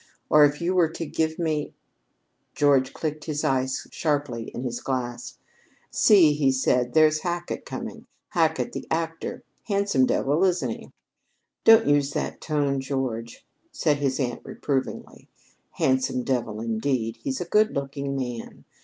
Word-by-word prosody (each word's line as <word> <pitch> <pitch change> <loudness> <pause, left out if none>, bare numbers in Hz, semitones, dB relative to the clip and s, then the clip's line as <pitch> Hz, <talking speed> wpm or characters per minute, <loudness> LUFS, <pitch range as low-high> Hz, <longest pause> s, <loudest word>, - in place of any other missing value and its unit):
Or 150 0 +7
if 145 +2 -1
you 175 +2 0
were 175 -3 +3
to 165 +1 -5
give 160 +1 -1
me 155 -3 -2 0.4
" - - -48
George 140 -3 +3
clicked 155 -1 -4
his 150 -2 -3
ice 130 0 0
sharply 145 -7 -1
in 120 - -6
his 120 -2 -4
glass. 125 -3 -4 0.5
"See," 180 -8 +6
he 145 -2 +2
said, 125 -2 +1
"there's 155 -1 +5
Hackett 175 0 -4
coming - - -5
in - - -17 0.2
Hackett 165 +5 +1
the - - -6
actor. 165 0 -3 0.2
Handsome 200 - +2
devil, 145 +6 +1
isn't 175 -10 +1
he?" - - -8 0.8
"Don't 225 0 +8
use 145 -1 +2
that - - -3
tone, 145 -3 0
George," 130 -4 -4 0.3
said 150 -3 +1
his 140 -1 -1
aunt 120 -3 -2
reprovingly. 135 -2 -4 0.4
"Handsome 130 -1 +1
devil, 115 -5 -2
indeed! 115 0 -1
He's 130 +3 -3
a 180 - -3
good 210 +5 +2
looking 140 0 -3
man. 125 -3 -6
140 Hz, 150 wpm, -25 LUFS, 130-160 Hz, 0.8 s, Don't